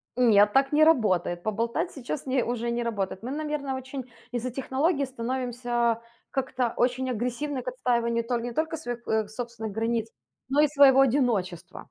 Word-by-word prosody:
нет, 210 -4 +5
так 270 +1 +3
не 305 +1 +5
работает. 185 - +3
Поболтать 230 - -1
сейчас 270 +1 -5
не 260 -2 +1
уже 235 0 -2
не 235 0 -1
работает. 200 -3 -3
Мы, 255 - -4
наверно, 295 -3 -3
очень 260 -1 -7 0.2
из-за 245 +1 -3
технологий 275 +4 0
становимся 240 -2 -1 0.3
как-то 255 -3 -1
очень 255 +1 +1
агрессивны 250 +4 -2
к - - -17
отстаиванию 235 -2 0
толь 235 0 -2
не 245 - -3
только 320 +2 -1
своих, 240 -5 -6
э, 220 -1 +1
собственных 225 -1 -6
границ, 225 +1 -1 0.4
но 285 +2 +4
и 300 - +5
своего 275 -2 +6
одиночества. 215 - 0
245 Hz, 160 wpm, -27 LUFS, 230-270 Hz, 0.4 s, своего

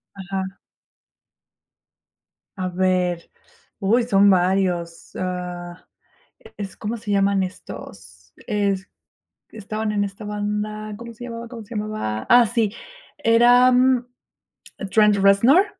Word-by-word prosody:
Ajá. 190 0 -5 2.0
A 185 -1 -2
ver. 180 -1 0 0.5
Uy, 225 +4 +2
son 200 -4 +4
varios, 180 -2 0
ah, 180 -1 -5 0.7
es, 200 -2 -7
¿cómo 220 +2 -4
se 215 -2 -5
llaman 200 0 +2
estos? 85 - -11
Es 200 -2 -1 0.6
estaban 215 0 -4
en 205 -1 +1
esta 200 +2 -7
banda, 210 +1 -3
¿cómo 235 +1 -9
se 235 +2 -10
llamaba 235 -1 -7
cómo 230 -2 -9
se 220 - -10
llamaba? 210 - -3
Ah, 245 -1 +7
sí, 225 -2 0 0.4
eran 245 +1 +5 0.8
Trent 210 -1 +4
Reznor 200 - +5
205 Hz, 105 wpm, -22 LUFS, 185-225 Hz, 2.0 s, Ah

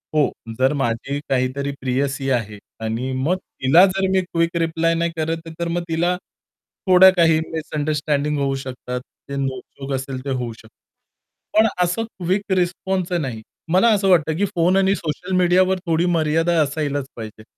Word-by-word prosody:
हो. 150 -2 +3 0.3
जर 130 +2 +3
माझी 135 +1 -2
काहीतरी 135 +2 0
प्रियसी 135 +1 -1
आहे 110 -4 -1 0.3
आणि 115 +4 -2
मग 135 +8 +1
तिला 165 -1 +4
जर 195 0 0
मी 190 0 +3
क्विक 170 -1 -1
रिप्लाय 165 0 +1
नाही 170 0 0
करत 165 +1 -2
तर 170 - -1
मग 170 +1 -1
तिला 175 +2 +1 0.7
थोड्या 185 0 +8
काही 165 -2 +5
मिसअंडरस्टँडिंग 150 -1 -1
होऊ 135 -1 0
शकतात. 125 -1 -5 0.3
ते 140 - -4
नोक-झोक 135 0 -5
असेल 130 -1 -4
ते - - -3
होऊ 125 -3 -2
शकतं. 110 0 -17 0.9
पण 220 - +6 0.2
असं 180 +6 0
क्विक 195 -2 -3
रिस्पॉन्सच 180 0 -1
नाही. 125 -6 -4 0.3
मला 190 +6 +5
असं 195 -2 +1
वाटतं 160 -3 +3
की 205 - +2
फोन 175 +2 +3
आणि 195 0 +3
सोशल 170 +2 -5
मीडियावर 185 +1 +3
थोडी 165 0 +1
मर्यादा 165 0 +2
असायलाच 145 -1 -1
पाहिजे. 110 -2 -9
160 Hz, 155 wpm, -21 LUFS, 135-180 Hz, 0.9 s, थोड्या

